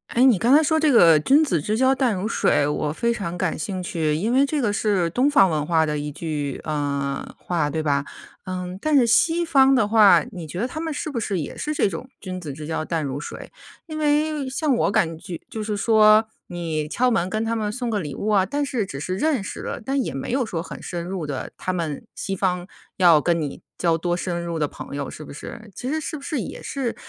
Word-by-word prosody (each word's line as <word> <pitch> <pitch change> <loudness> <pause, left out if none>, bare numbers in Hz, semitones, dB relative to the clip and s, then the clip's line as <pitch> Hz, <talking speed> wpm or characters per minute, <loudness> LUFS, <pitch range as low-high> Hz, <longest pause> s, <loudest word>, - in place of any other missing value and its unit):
诶， 245 - +5
你 250 -8 +5
刚 245 +7 +5
才 310 - +6
说 315 +1 +2
这 310 -1 +3
个 170 - +7
“君 275 - +4
子 175 - 0
之 210 +8 -1
交 260 +2 +4
淡 260 -5 +1
如 185 +2 -3
水”， 145 -9 +2
我 150 0 -1
非 235 +7 0
常 185 -6 -4
感 180 -2 -1
兴 185 +2 -3
趣， 160 -3 -1
因 205 +9 -1
为 265 +3 +4
这 295 +1 -1
个 220 -5 +1
是 200 -4 +1
东 255 - +2
方 195 -10 +5
文 150 -2 -1
化 165 -2 +3
的 150 -1 -2
一 145 0 -4
句， 145 -3 -4
呃， 140 -2 -3
话， 165 -4 -1
对 155 +1 -2
吧？ 140 -2 +1 0.4
嗯， 185 0 -5
但 310 -1 +1
是 260 -4 +6
西 330 +8 +3
方 270 -5 +5
的 230 -5 +3
话， 210 -1 +6
你 175 -6 -7
觉 175 +5 -5
得 240 - 0
他 310 - -6
们 320 -1 -3
是 300 - -4
不 245 - -2
是 200 -5 -2
也 145 - -7
是 300 - -2
这 250 - +2
种 190 +8 -6
“君 185 -2 -5
子 155 -6 -6
之 150 +2 -8
交 155 0 -3
淡 165 -1 -1
如 140 0 -3
水”？ 150 - -8 0.3
因 310 -2 -6
为 300 -1 +1
像 280 +2 0
我 - - +2
感 165 -4 +1
觉， 175 0 -8
就 220 - -5
是 210 0 -2
说， 215 +1 +5 0.2
你 165 -3 -3
敲 250 +10 +1
门 185 -6 +1
跟 215 +3 -1
他 230 0 -1
们 215 -1 -1
送 245 +3 -3
个 215 -2 0
礼 150 -7 -5
物 210 - -3
啊， 200 -3 +4
但 285 +8 -1
是 255 -7 -1
只 140 -6 -7
是 185 +4 -3
认 295 -4 +1
识 - - -6
了， - - -5
但 270 +2 0
也 - - -3
没 135 - -4
有 255 0 +1
说 170 -6 -4
很 - - -9
深 175 -2 -5
入 180 -4 -4
的， 140 -2 -5
他 185 - -2
们 165 -5 -4
西 195 - -4
方 180 -2 0 0.3
要 175 -4 +6
跟 170 +2 +1
你 145 -2 -5 0.2
交 170 -2 +2
多 175 +1 -1
深 175 -1 -3
入 170 -1 -3
的 155 - +1
朋 - - -8
友 140 -1 -3
是 155 - -9
不 - - -10
是？ 215 +9 -9
其 255 - -4
实 315 - 0
是 310 - -5
不 290 - -8
是 300 -2 -2
也 - - -6
是 265 -4 -3
190 Hz, 270 characters per minute, -23 LUFS, 160-255 Hz, 0.4 s, 个